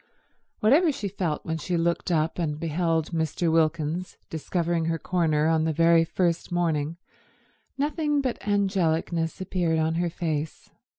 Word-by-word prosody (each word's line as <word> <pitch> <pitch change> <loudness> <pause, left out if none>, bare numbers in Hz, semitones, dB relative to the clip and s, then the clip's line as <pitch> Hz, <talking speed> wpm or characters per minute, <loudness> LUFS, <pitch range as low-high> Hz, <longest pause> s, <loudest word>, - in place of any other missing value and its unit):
Whatever 300 +10 +5
she 215 -7 -4
felt 180 -5 -3
when 160 0 -2
she 175 +3 -1
looked 170 +2 0
up 160 0 0
and 150 -3 -2
beheld 165 0 0
Mr. 165 0 0
Wilkins 165 +2 0
discovering 165 +1 -1
her 165 0 0
corner 160 -3 +1
on 160 -1 +2
the 160 - 0
very 165 +1 +5
first 170 0 -1
morning, 165 -2 0 0.8
nothing 295 +1 0
but 260 -3 -2
angelicness 175 -5 0
appeared 175 -3 0
on 160 0 +1
her 175 - 0
face. 160 -2 -4
165 Hz, 140 wpm, -26 LUFS, 160-180 Hz, 0.8 s, Whatever